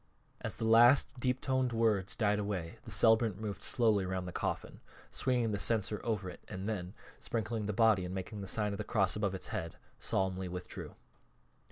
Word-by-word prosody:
As - - -3
the 115 - -3
last 120 +4 +5
deep 125 +1 0
toned 130 -3 0
words 110 -4 +2
died 105 -2 +2
away 95 -5 -4
the - - -9
celebrant 110 -3 +4
moved 105 -2 -5
slowly 110 -6 +3
around 95 0 -3
the 90 - -5
coffin, - - -3 0.3
swinging 120 -4 0
the 100 - -2
censer 105 -2 +1
over 105 -5 -1
it 90 - -9
and 95 +2 -5
then, 95 -2 -4 0.2
sprinkling 110 -2 -3
the - - 0
body 110 -3 +4
and 90 +1 -5
making 95 +2 -5
the 100 - -6
sign 105 +1 0
of 100 - -5
the - - -1
cross 100 -4 +1
above 100 -2 -1
its 95 - -5
head, 80 -1 -4 0.2
solemnly 95 -1 -1
withdrew. 90 0 -7
105 Hz, 190 wpm, -33 LUFS, 95-115 Hz, 0.3 s, last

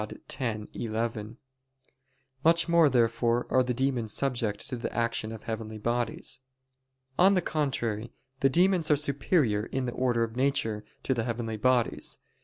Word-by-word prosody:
Dei - - -10
x, 115 -5 -1
11). 110 0 -3 1.1
Much 165 +1 +4
more 170 -3 +5
therefore 120 -1 +2
are 130 - +5
the 125 0 -1
demons 125 -4 0
subject 120 -6 -1
to 130 - -3
the 120 - -4
action 115 -2 -1
of 110 -1 -8
heavenly 110 -1 -5
bodies. 120 +2 -2 0.8
On 195 +2 +6
the 185 - +3
contrary, 120 -7 -2 0.3
The 135 - +4
demons 175 +2 +3
are 150 - +6
superior 140 - +1
in 130 -1 -2
the 120 - -2
order 120 -2 +1
of 115 0 -4
nature, 125 -5 0 0.2
to 130 - +1
the 115 -3 -1
heavenly 115 -2 -3
bodies. 125 +1 +1
120 Hz, 155 wpm, -28 LUFS, 115-135 Hz, 1.1 s, On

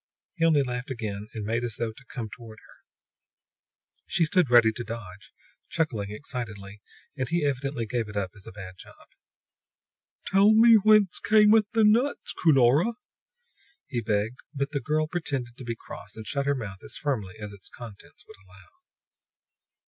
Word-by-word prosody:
He 165 -3 +1
only 155 -4 +4
laughed 125 -1 -4
again 105 -5 -5
and 110 -2 -4
made 115 +3 -1
as 115 -3 -3
though 115 -1 -2
to 110 - -17
come 120 -4 -5
toward 110 0 -12
her. - - -21 1.2
She 165 - +2
stood 180 -3 +2
ready 120 -2 +6
to 120 +2 -6
dodge, 105 -4 -9 0.4
chuckling 115 -11 -1
excitedly, 105 -4 -7 0.3
and 130 -3 -3
he 170 -2 +1
evidently 135 -3 -2
gave 115 0 -2
it 105 - -6
up 95 -3 -2
as 105 -3 -11
a - - -8
bad 95 -2 -10
job. - - -16 1.2
"Tell 200 +3 +5
me 230 +1 +7
whence 215 -3 +5
cameth 215 0 +5
the 225 -1 +4
nuts, 235 +7 +2
Cunora!" 150 - +4 0.9
he 120 -4 -3
begged; 110 +3 -1 0.2
but 140 +1 -2
the 140 - -2
girl 155 0 0
pretended 140 -8 -4
to - - -8
be 115 -1 -4
cross, - - -11
and 110 0 -8
shut 140 +4 -2
her 140 - +2
mouth 100 -7 -7
as - - -6
firmly 110 -9 -3
as 105 -1 -7
its 100 - -11
contents 115 -5 -12
would - - -14
allow. 95 -2 -19
120 Hz, 170 wpm, -27 LUFS, 105-155 Hz, 1.2 s, me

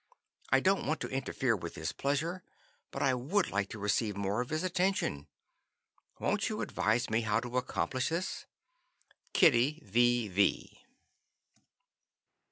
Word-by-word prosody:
I - - +5
don't 190 -4 +2
want 155 +2 0
to - - -2
interfere 130 -2 0
with 85 -4 -7
his 80 0 -3
pleasure, 160 +6 -1 0.5
but - - -3
I 135 - +3
would 165 +10 0
like 100 -1 -1
to - - -7
receive 105 0 0
more 100 +3 0
of 125 - -5
his 155 +2 -1
attention. 180 - 0 0.9
Won't - - 0
you - - -3
advise 110 +4 0
me 110 +1 +1
how 110 0 +1
to 125 +1 -4
accomplish 130 +1 -2
this? 170 +3 -3 0.9
"Kittie 140 +3 +4
V. 120 +2 +3
V." 100 +1 0
125 Hz, 140 wpm, -31 LUFS, 105-155 Hz, 0.9 s, I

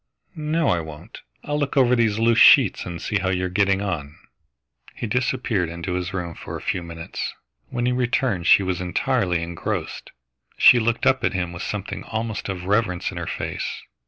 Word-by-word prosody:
No, 155 -1 0
I 90 - +2
won't, 80 -2 -9 0.2
I'll 145 0 -2
look 145 -1 -2
over 125 -2 +5
these 110 -3 +2
loose 115 0 +3
sheets 125 -11 +6
and 85 -1 -5
see 105 - -1
how 95 - -1
you 90 0 0
are - - -2
getting 100 +1 +2
on." 80 -5 -4 0.8
He - - -4
disappeared 120 -6 0
into 85 +2 -5
his 90 +1 -2
room 90 -3 -4
for - - -7
a - - -8
few 90 - -2
minutes. 85 -1 -6 0.3
When 120 0 -2
he 125 - +2
returned 125 -6 0
she 100 - +6
was 95 -1 -2
entirely 90 -1 0
engrossed. 85 0 -4 0.5
She 125 - +7
looked 115 +1 0
up 130 -1 +3
at - - +1
him 90 -2 -2
with 85 - -7
something 100 0 -4
almost 110 -2 -4
of 90 -2 -4
reverence 100 -3 0
in - - -9
her - - -4
face. - - -4
100 Hz, 190 wpm, -23 LUFS, 90-120 Hz, 0.8 s, She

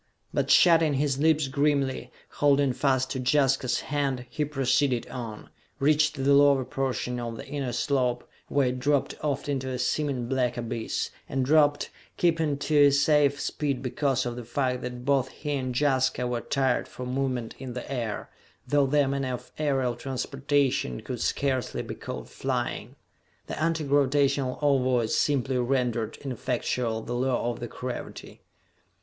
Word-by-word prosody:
But, - - 0
shutting 165 -4 +5
his 140 -1 0
lips 155 -1 +3
grimly, 140 -1 0 0.3
holding 140 -2 +4
fast 130 0 +1
to 130 - -2
Jaska's 130 -1 +2
hand, 135 -3 -2
he 150 - -1
proceeded 135 -3 +1
on, 115 -4 -7 0.3
reached 150 +1 +3
the 140 0 +2
lower 140 -2 +5
portion 130 -2 -2
of 115 -1 -5
the - - -8
inner 140 -4 -3
slope, 125 0 0 0.2
where 140 -3 +2
it 125 0 -3
dropped 140 +1 +1
off 145 -2 -1
into 135 -2 -2
a 130 - -3
seeming 130 0 -1
black 125 -1 0
abyss, 115 -1 -3 0.2
and 135 -1 0
dropped, 145 0 +3 0.3
keeping 160 -4 +1
to 145 0 +4
a 140 - +6
safe 140 0 +3
speed 140 -4 -2
because 135 0 0
of 120 -1 -3
the 125 - -6
fact 125 +1 -1
that 125 0 -6
both 135 -2 +2
he 150 +2 -6
and 130 -3 -1
Jaska 130 -3 +1
were 120 -1 -1
attired 130 0 0
for 125 - -8
movement 125 -2 -2
in 130 -2 -6
the 125 +2 -6
air 115 -5 -3 0.4
though 145 -1 +3
their 145 0 +3
manner 135 -2 -1
of - - -12
aerial 135 -5 +1
transportation 135 - -1
could - - -5
scarcely 130 -4 -1
be - - -6
called 65 -1 -7
flying. - - -3 0.5
The - - -5
anti 165 0 +1
gravitational 140 -2 +2
ovoids 130 -5 +2
simply 135 -3 +1
rendered 120 -3 0
ineffectual 125 -3 -2
the 120 - -5
law 125 -1 0
of 120 0 -6
gravity. 125 +2 -7
135 Hz, 155 wpm, -27 LUFS, 125-145 Hz, 0.5 s, a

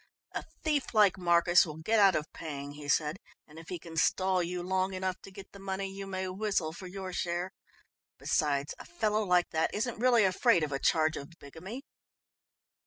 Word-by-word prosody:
"A - - -4 0.2
thief 295 -6 0
like 205 -3 +5
Marcus 175 0 +5
will 155 -2 -6
get 215 +8 +1
out 195 -3 +6
of 150 +1 -3
paying," 145 -3 -6
he 145 0 -9
said, 150 +3 +1 0.3
"and 155 +2 -12
if 165 - -12
he 180 - -3
can 165 0 -11
stall 185 +2 +2
you 175 +1 -3
long 190 +1 0
enough 185 0 -3
to - - -11
get 195 0 -11
the 200 - -13
money 195 0 -3
you 195 0 -7
may 190 -1 -3
whistle 185 -4 -1
for 185 +2 -9
your 185 0 -6
share. 175 +1 -2 0.7
Besides, 145 -1 0
a - - -9
fellow 210 +5 0
like 180 -3 +2
that 160 0 +1
isn't 225 +2 -2
really 240 -2 +5
afraid 190 -1 +3
of 150 - -2
a 135 - -1
charge 155 0 +2
of 140 - -7
bigamy." 185 - -9
185 Hz, 195 wpm, -30 LUFS, 160-195 Hz, 0.7 s, out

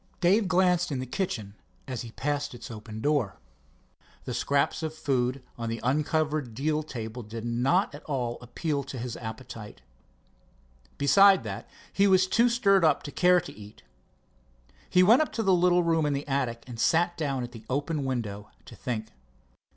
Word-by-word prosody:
Dave 195 +4 +3
glanced 180 -2 +2
into 130 -2 -2
the 125 - -19
kitchen 115 - -3 0.3
as 130 -3 -4
he 120 - -7
passed 145 -2 -2
its 120 0 -9
open 110 0 -8
door. 145 -7 0 0.9
The 125 - -4
scraps 140 +5 0
of 155 -1 -4
food 130 -3 -1 0.2
on 115 -1 -3
the 115 0 -3
uncovered 150 -1 0
deal 150 +4 0
table 120 -5 -6
did 110 +1 -7
not 130 - +1
at 145 - -10
all 125 -5 -2
appeal 140 +5 -2
to 135 -1 -7
his 120 0 -4
appetite. 110 - -8 1.1
Besides 195 +7 +6
that, - - -6 0.2
he 200 0 +4
was 185 -1 +5
too 230 +6 +3
stirred 200 -6 +3
up 160 - +3
to 145 - -6
care 180 +2 +4
to - - -10
eat. 105 0 -13 1.1
He 180 0 +5
went 225 +9 +6
up 310 - -1
to 225 - -1
his 195 - +1
little 180 0 +4
room 165 -2 +2
in 145 - 0
the 140 +1 -4
attic 125 -4 -1
and 120 -3 -9
sat 175 +6 +2
down 140 -6 -2
at 120 - -6
the 115 -2 -11
open 145 +3 -1
window 110 -6 -4 0.2
to 115 - -12
think. 110 0 -4
140 Hz, 175 wpm, -27 LUFS, 120-175 Hz, 1.1 s, Besides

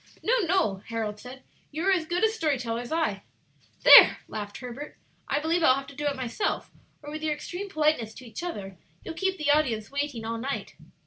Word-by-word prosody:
"No, 475 - +3
no," 345 - +1
Harold 220 -2 -3
said; 255 +3 -11 0.3
"you 310 +3 -4
are 390 - +4
as 345 -4 +1
good 350 +4 -1
a 440 - +5
story 315 -11 0
teller 230 -2 -3
as 245 - -9
I." 320 0 0 0.6
"There!" - - +10
laughed 205 -1 -6
Herbert. 250 +4 -8 0.3
"I 285 - 0
believe 325 +3 0
I'll 260 -5 +5
have 275 0 -5
to 280 - -13
do 295 +1 -2
it 285 - 0
myself, 260 - -3 0.3
or 295 - -8
with 310 +1 -6
your 310 -1 0
extreme 365 +6 -6
politeness 300 - 0
to 260 - -11
each 235 - -8
other 195 - -6 0.3
you'll 330 - -5
keep 380 +3 -1
the 300 -2 +1
audience 255 -8 +1
waiting 280 -5 -3
all 230 0 -3
night. 275 +4 -4
290 Hz, 210 wpm, -27 LUFS, 235-325 Hz, 0.6 s, There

